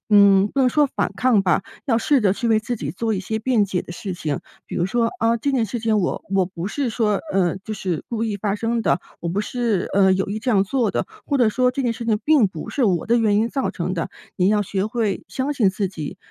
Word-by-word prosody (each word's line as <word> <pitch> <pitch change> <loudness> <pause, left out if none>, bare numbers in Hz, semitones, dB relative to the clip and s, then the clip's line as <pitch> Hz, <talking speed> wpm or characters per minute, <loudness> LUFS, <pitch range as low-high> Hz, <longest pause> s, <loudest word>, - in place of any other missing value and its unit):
嗯， 200 -1 +6
不 275 - -1
能 255 - +5
说 295 +3 +3
反 - - -2
抗 240 -6 +3
吧， 180 0 +2 0.2
要 230 - +3
试 280 +3 +2
着 200 -4 +3
去 230 +4 -2
为 220 - +4
自 240 +2 -3
己 - - -4
做 225 +3 -2
一 190 - -2
些 220 +3 -3
辩 230 -2 +2
解 190 -2 -2
的 175 - -9
事 190 +2 -5
情。 150 -5 -3 0.3
比 - - -7
如 175 - +1
说： 230 +3 +1
“啊， 230 +1 +3
这 280 +5 -1
件 250 -4 +2
事 240 +4 -4
情 220 -2 +2
我 175 - -2
我 190 -2 +3
不 175 0 -6
是 270 +5 -2
说， 215 -3 +1
呃， 185 -2 +1
就 210 +3 -7
是 180 -5 -3
故 230 -1 -2
意 210 -2 -2
发 200 0 -1
生 230 +2 -1
的， 180 - +2 0.2
我 170 - -3
不 190 +4 -1
是， 225 -3 -1
呃， 190 -1 +5
有 190 +1 0
意 210 - -3
这 245 +3 -1
样 200 -4 +3
做 230 +1 0
的。” - - -2 0.2
或 285 - +1
者 240 -4 +5
说： 250 +3 +2
“这 275 - -2
件 240 -2 +1
事 230 +1 -7
情 215 -2 +2
并 295 -8 +5
不 165 -4 -8
是 265 - +1
我 180 -5 +1
的 235 +1 +3
原 210 -2 +3
因 225 +2 +2
造 270 - -1
成 - - -3
的。” - - -2 0.3
你 185 0 +3
要 210 0 +3
学 195 +1 -2
会 220 -4 -2
相 260 +9 -2
信 230 -9 +3
自 190 +1 -1
己， 160 -6 -6
215 Hz, 285 characters per minute, -22 LUFS, 195-235 Hz, 0.3 s, 嗯